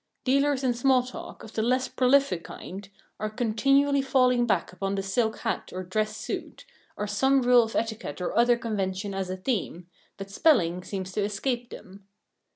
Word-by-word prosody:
Dealers 275 Hz, +1 st, +2 dB
in 250 Hz, -2 st, +2 dB
small 255 Hz, +1 st, +3 dB
talk, 255 Hz, -, -9 dB
of 220 Hz, -, -11 dB
the 220 Hz, -, -1 dB
less 255 Hz, +3 st, +1 dB
prolific 255 Hz, -9 st, +2 dB
kind, 195 Hz, +2 st, -9 dB, 0.3 s
are 215 Hz, -, -2 dB
continually 275 Hz, +5 st, +2 dB
falling 250 Hz, -2 st, +3 dB
back 190 Hz, -4 st, 0 dB
upon 195 Hz, +1 st, -2 dB
the 195 Hz, -, -2 dB
silk 220 Hz, +3 st, 0 dB
hat -, -, -3 dB
or 185 Hz, +1 st, -5 dB
dress 215 Hz, +4 st, -2 dB
suit, -, -, -6 dB, 0.3 s
or 210 Hz, -, -2 dB
some 265 Hz, +6 st, +2 dB
rule 245 Hz, 0 st, +6 dB
of 225 Hz, -1 st, -4 dB
etiquette 220 Hz, -10 st, -3 dB
or 180 Hz, -, -3 dB
other 240 Hz, 0 st, +4 dB
convention 200 Hz, -3 st, -3 dB
as 190 Hz, -1 st, -3 dB
a 185 Hz, -, -3 dB
theme, 185 Hz, -5 st, -3 dB, 0.3 s
but 195 Hz, 0 st, -8 dB
spelling 180 Hz, -, +3 dB
seems 190 Hz, -1 st, -5 dB
to 210 Hz, -, -2 dB
escape 240 Hz, +4 st, -2 dB
them. 195 Hz, +1 st, -12 dB
220 Hz, 175 wpm, -27 LUFS, 195-255 Hz, 0.3 s, rule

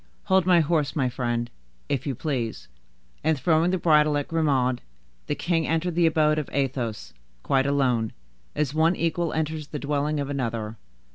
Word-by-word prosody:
Hold 190 Hz, -2 st, +2 dB
my 175 Hz, -2 st, +6 dB
horse, 150 Hz, -3 st, 0 dB
my 130 Hz, -5 st, +1 dB
friend, 120 Hz, -1 st, -2 dB, 0.4 s
if 140 Hz, -1 st, -2 dB
you 135 Hz, -, -1 dB
please." 125 Hz, -6 st, -3 dB, 0.6 s
And, 160 Hz, 0 st, +2 dB
throwing 160 Hz, +4 st, +3 dB
the 185 Hz, -, +1 dB
bridle 150 Hz, -3 st, +4 dB
to 145 Hz, -, +1 dB
Grimaud, 135 Hz, -6 st, +1 dB, 0.5 s
the -, -, -1 dB
king 165 Hz, -3 st, 0 dB
entered 165 Hz, +3 st, 0 dB
the 170 Hz, 0 st, +3 dB
abode 155 Hz, -1 st, +3 dB
of 150 Hz, -, -5 dB
Athos, 125 Hz, -, -2 dB, 0.3 s
quite 135 Hz, 0 st, +2 dB
alone, 125 Hz, -6 st, +1 dB, 0.4 s
as 145 Hz, -2 st, 0 dB
one 160 Hz, +3 st, +3 dB
equal 170 Hz, 0 st, -1 dB
enters 155 Hz, -1 st, -2 dB
the 150 Hz, -, -5 dB
dwelling 145 Hz, +1 st, -1 dB
of 140 Hz, -, -2 dB
another. 115 Hz, -5 st, -3 dB
150 Hz, 165 wpm, -25 LUFS, 130-160 Hz, 0.6 s, my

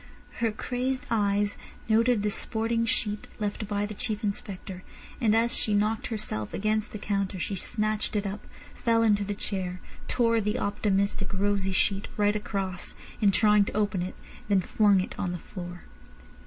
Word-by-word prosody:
Her 230 Hz, -1 st, +2 dB
crazed 255 Hz, +4 st, -2 dB
eyes 205 Hz, -2 st, +2 dB, 0.3 s
noted 225 Hz, 0 st, +3 dB
the 210 Hz, -, +1 dB
sporting 230 Hz, +2 st, +1 dB
sheet 210 Hz, -3 st, -1 dB
left 210 Hz, 0 st, -2 dB
by 205 Hz, 0 st, 0 dB
the 210 Hz, -, -5 dB
Chief 210 Hz, +1 st, -3 dB
Inspector, 195 Hz, -2 st, -4 dB, 0.4 s
and 220 Hz, -2 st, +4 dB
as 235 Hz, +2 st, +3 dB
she 210 Hz, -, +1 dB
knocked 215 Hz, +2 st, +1 dB
herself 155 Hz, -, -3 dB
against 215 Hz, +1 st, 0 dB
the -, -, -5 dB
counter 200 Hz, -2 st, -1 dB
she 185 Hz, -, -2 dB
snatched 215 Hz, +2 st, -1 dB
it 205 Hz, 0 st, 0 dB
up, 200 Hz, +2 st, -4 dB, 0.3 s
fell 230 Hz, -1 st, +2 dB
into 210 Hz, -2 st, +4 dB
the 205 Hz, 0 st, -3 dB
chair, 185 Hz, -3 st, -3 dB, 0.3 s
tore 230 Hz, -2 st, +3 dB
the 210 Hz, 0 st, 0 dB
optimistic, 200 Hz, -1 st, 0 dB
rosy 195 Hz, 0 st, +1 dB
sheet 195 Hz, +1 st, +1 dB
right 205 Hz, 0 st, +3 dB
across 195 Hz, -3 st, -3 dB, 0.3 s
in 205 Hz, -, +6 dB
trying 210 Hz, +1 st, +5 dB
to -, -, -4 dB
open 205 Hz, -3 st, +1 dB
it, 180 Hz, -, -4 dB, 0.3 s
then 195 Hz, -2 st, +4 dB
flung 200 Hz, 0 st, +4 dB
it -, -, -5 dB
on 180 Hz, -2 st, -1 dB
the -, -, -3 dB
floor. 175 Hz, -1 st, -8 dB
205 Hz, 170 wpm, -28 LUFS, 195-215 Hz, 0.4 s, in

